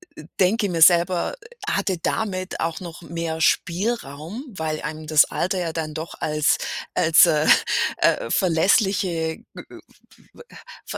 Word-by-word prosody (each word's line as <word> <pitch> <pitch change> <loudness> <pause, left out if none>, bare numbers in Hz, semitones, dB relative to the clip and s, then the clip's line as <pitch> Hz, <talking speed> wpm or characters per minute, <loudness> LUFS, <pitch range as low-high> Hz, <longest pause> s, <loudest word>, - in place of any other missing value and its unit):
äh, 155 - -11 0.2
denke 205 +3 +2
mir 170 -3 -3
selber 175 - +4 0.3
hatte 185 -3 -1
damit 185 -1 -3
auch 165 +2 -3
noch 175 -1 -9
mehr 165 -1 -5
Spielraum, 175 - -1
weil 160 -7 -4
einem 155 +1 -6
das 155 -1 +6
Alter 185 +1 -2
ja 170 -2 -2
dann 160 -1 -5
doch 160 +1 -7
als 150 -1 +1 0.4
als, 165 -1 +6
äh, 155 -2 +1 0.5
äh, 115 - +1
verlässliche, 180 - +1
g - - -23
äh, - - -9 1.2
v - - -6
170 Hz, 135 wpm, -22 LUFS, 160-185 Hz, 1.2 s, das